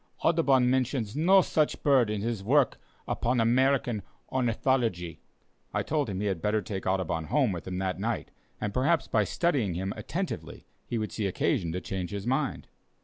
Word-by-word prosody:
Audubon 140 Hz, -7 st, +4 dB
mentions 125 Hz, -3 st, 0 dB
no 185 Hz, +5 st, +5 dB
such 155 Hz, -2 st, 0 dB
bird 135 Hz, -6 st, +4 dB
in 105 Hz, -1 st, -2 dB
his 115 Hz, -2 st, -2 dB
work 135 Hz, +5 st, +3 dB, 0.3 s
upon 125 Hz, +1 st, 0 dB
American 120 Hz, -1 st, +2 dB, 0.3 s
Ornithology." 115 Hz, -, 0 dB, 0.6 s
I -, -, +1 dB
told 150 Hz, -5 st, 0 dB
him 95 Hz, -2 st, -3 dB
he -, -, -1 dB
had 95 Hz, -5 st, -1 dB
better 105 Hz, 0 st, +1 dB
take 95 Hz, 0 st, -5 dB
Audubon 90 Hz, -4 st, 0 dB
home 130 Hz, -, +2 dB
with 85 Hz, -1 st, -6 dB
him 90 Hz, -1 st, -3 dB
that 95 Hz, -2 st, -2 dB
night, -, -, -2 dB, 0.3 s
and 105 Hz, -1 st, -3 dB
perhaps 145 Hz, +6 st, +2 dB
by 110 Hz, -, +2 dB
studying 135 Hz, -, 0 dB
him 95 Hz, +2 st, -2 dB
attentively -, -, -5 dB, 0.2 s
he 120 Hz, -, -2 dB
would 110 Hz, -1 st, -2 dB
see 105 Hz, -3 st, -1 dB
occasion 90 Hz, -2 st, 0 dB
to 90 Hz, -, -3 dB
change 95 Hz, -2 st, -4 dB
his 100 Hz, -1 st, -5 dB
mind. 135 Hz, +3 st, -1 dB
115 Hz, 175 wpm, -28 LUFS, 95-135 Hz, 0.6 s, no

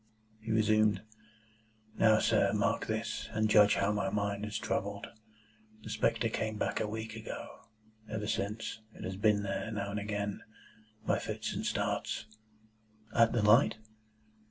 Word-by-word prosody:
He 110 Hz, +1 st, -9 dB
resumed. 110 Hz, -2 st, +3 dB, 0.9 s
"Now, 110 Hz, -1 st, +5 dB
sir, 105 Hz, -3 st, +3 dB
mark 105 Hz, +2 st, +1 dB
this, 110 Hz, +1 st, -3 dB
and 110 Hz, 0 st, +2 dB
judge 105 Hz, -1 st, +6 dB
how 100 Hz, -, +2 dB
my 105 Hz, -2 st, 0 dB
mind 100 Hz, 0 st, -1 dB
is 105 Hz, 0 st, -3 dB
troubled. 100 Hz, -1 st, -2 dB, 0.8 s
The -, -, -7 dB
spectre -, -, +1 dB
came 110 Hz, -1 st, -2 dB
back -, -, -1 dB
a 110 Hz, -, 0 dB
week 110 Hz, +1 st, -5 dB
ago. 110 Hz, -1 st, -8 dB, 0.4 s
Ever 110 Hz, -1 st, -3 dB
since, 110 Hz, +1 st, -2 dB, 0.2 s
it -, -, -9 dB
has 95 Hz, 0 st, -4 dB
been 105 Hz, +1 st, +3 dB
there, 95 Hz, +1 st, -3 dB
now 100 Hz, -2 st, -3 dB
and 105 Hz, -, -2 dB
again, 105 Hz, -1 st, -3 dB, 0.6 s
by -, -, +2 dB
fits -, -, -4 dB
and -, -, -3 dB
starts." -, -, -1 dB, 0.9 s
"At 115 Hz, -1 st, +5 dB
the 115 Hz, -, +1 dB
light?" 115 Hz, +3 st, +5 dB
105 Hz, 150 wpm, -32 LUFS, 100-110 Hz, 0.9 s, judge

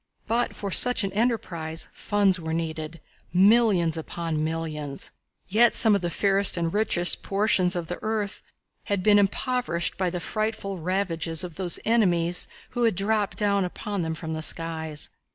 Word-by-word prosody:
But 235 Hz, +2 st, -1 dB
for 200 Hz, -1 st, -5 dB
such 250 Hz, +3 st, +5 dB
an 195 Hz, -1 st, -3 dB
enterprise 175 Hz, -8 st, -1 dB
funds 200 Hz, -3 st, +1 dB
were 160 Hz, -1 st, -3 dB
needed 160 Hz, 0 st, -4 dB, 0.3 s
millions 190 Hz, -3 st, +4 dB
upon 160 Hz, -1 st, -3 dB
millions. 155 Hz, -3 st, -4 dB, 0.4 s
Yet 225 Hz, +5 st, +4 dB
some 220 Hz, -2 st, +5 dB
of 200 Hz, -, +2 dB
the 175 Hz, -, -1 dB
fairest 195 Hz, +2 st, +1 dB
and 165 Hz, -1 st, -1 dB
richest 200 Hz, -4 st, +2 dB
portions 195 Hz, -3 st, +1 dB
of 175 Hz, -1 st, -2 dB
the 175 Hz, +2 st, -6 dB
earth 215 Hz, -2 st, -2 dB, 0.4 s
had 200 Hz, -2 st, -1 dB
been 205 Hz, 0 st, +6 dB
impoverished 205 Hz, -3 st, 0 dB
by 185 Hz, -1 st, 0 dB
the 180 Hz, 0 st, -4 dB
frightful 205 Hz, 0 st, -3 dB
ravages 165 Hz, -2 st, -1 dB
of 175 Hz, -2 st, -6 dB
those 180 Hz, 0 st, -1 dB
enemies 180 Hz, -6 st, +2 dB, 0.2 s
who 245 Hz, -, -3 dB
had 225 Hz, -, +2 dB
dropped 205 Hz, +1 st, 0 dB
down 200 Hz, -2 st, +2 dB
upon 200 Hz, +2 st, -4 dB
them 160 Hz, -1 st, -2 dB
from 160 Hz, 0 st, -6 dB
the 155 Hz, -, -4 dB
skies. 160 Hz, -2 st, -4 dB
185 Hz, 160 wpm, -25 LUFS, 165-205 Hz, 0.4 s, been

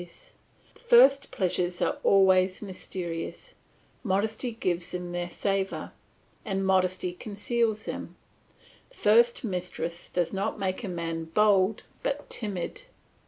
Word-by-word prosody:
The 175 Hz, -1 st, -17 dB
first 285 Hz, -, +6 dB
pleasures 180 Hz, -1 st, -1 dB
are -, -, 0 dB
always 190 Hz, 0 st, +4 dB
mysterious, 185 Hz, -, -6 dB, 0.5 s
modesty 220 Hz, +4 st, 0 dB
gives 175 Hz, -6 st, -2 dB
them 180 Hz, -1 st, -5 dB
their 175 Hz, 0 st, -3 dB
savour, 195 Hz, +2 st, -2 dB, 0.5 s
and 195 Hz, -3 st, -2 dB
modesty 185 Hz, -1 st, +1 dB
conceals 215 Hz, +3 st, -1 dB
them; -, -, -6 dB, 0.7 s
the -, -, -21 dB
first 235 Hz, +4 st, +4 dB
mistress 180 Hz, -4 st, -4 dB
does 175 Hz, 0 st, -1 dB
not 195 Hz, +3 st, -2 dB
make 190 Hz, +2 st, -2 dB
a -, -, -3 dB
man 165 Hz, -2 st, -3 dB
bold 200 Hz, +3 st, +3 dB, 0.2 s
but 290 Hz, +1 st, -3 dB
timid. 205 Hz, -, -3 dB
190 Hz, 115 wpm, -28 LUFS, 180-215 Hz, 0.7 s, first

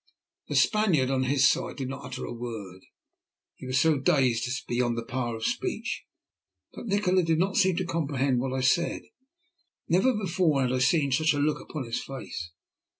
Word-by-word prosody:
The -, -, -3 dB
Spaniard, 175 Hz, -12 st, +3 dB
on 130 Hz, -1 st, +1 dB
his 130 Hz, 0 st, +4 dB
side, -, -, 0 dB
did 135 Hz, -, -4 dB
not 135 Hz, -, -7 dB
utter 130 Hz, 0 st, -6 dB
a -, -, -6 dB
word. 110 Hz, -6 st, -7 dB, 0.8 s
He 130 Hz, -, -9 dB
was 130 Hz, 0 st, +1 dB
so 160 Hz, -3 st, +3 dB
dazed 125 Hz, -4 st, +2 dB
as 125 Hz, -, -2 dB
to -, -, -17 dB
be 120 Hz, -, -2 dB
beyond 120 Hz, -1 st, +1 dB
the 115 Hz, -, -4 dB
power 120 Hz, -1 st, -3 dB
of 110 Hz, -, -5 dB
speech. -, -, -3 dB, 0.7 s
But -, -, -8 dB
Nikola 195 Hz, -2 st, +2 dB
did 165 Hz, -2 st, +1 dB
not 190 Hz, +3 st, 0 dB
seem 190 Hz, -3 st, +3 dB
to 185 Hz, -, -1 dB
comprehend 140 Hz, -6 st, 0 dB
what 130 Hz, +1 st, -2 dB
I 130 Hz, 0 st, -1 dB
said. 170 Hz, +7 st, +1 dB, 0.8 s
Never 190 Hz, +9 st, +3 dB
before 175 Hz, -8 st, +1 dB
had 125 Hz, -, 0 dB
I 130 Hz, -, +1 dB
seen 140 Hz, +2 st, +2 dB
such 155 Hz, +4 st, +3 dB
a -, -, -2 dB
look 150 Hz, +1 st, +1 dB
upon 150 Hz, -4 st, -6 dB
his 115 Hz, -2 st, -3 dB
face. 115 Hz, -10 st, -7 dB
135 Hz, 200 wpm, -27 LUFS, 125-165 Hz, 0.8 s, his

